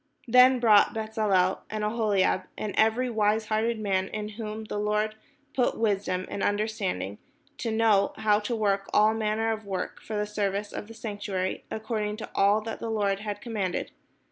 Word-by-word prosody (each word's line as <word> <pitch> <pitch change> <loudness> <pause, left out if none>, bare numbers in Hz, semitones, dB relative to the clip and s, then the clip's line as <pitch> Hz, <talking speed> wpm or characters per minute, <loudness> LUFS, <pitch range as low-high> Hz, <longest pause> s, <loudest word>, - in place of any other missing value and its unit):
Then 250 +2 +6
wrought 220 -3 +5
Bezaleel 215 -4 +1
and 215 -1 -3
AhoHab, 210 -4 +1
and 210 -2 -3
every 225 +4 +3
wise 220 -1 +1
hearted 225 +1 +1
man, 190 -3 0
in 210 +1 -5
whom 215 0 -6
the 210 -1 -4
Lord 210 +1 0 0.4
put 250 - +1
wisdom 195 -4 0
and 200 - -5
under 205 +1 +1
standing 105 - -3 0.4
to 230 - -2
know 220 -3 +3
how 210 -1 +3
to 215 +3 -2
work 200 -2 0
all 215 +1 +5
manner 220 0 0
of 220 0 -3
work 190 -3 -4
for 215 - -6
the 210 - 0
service 205 -1 -2
of 205 - -6
the 225 - -11
sanctuary, 205 -4 -3
according 215 -1 -3
to 220 - -7
all 205 +2 +3
that 225 +1 -6
the 230 - -4
Lord 200 -3 0
had 205 -1 -5
commanded. 205 -6 -3
210 Hz, 175 wpm, -27 LUFS, 200-220 Hz, 0.4 s, Then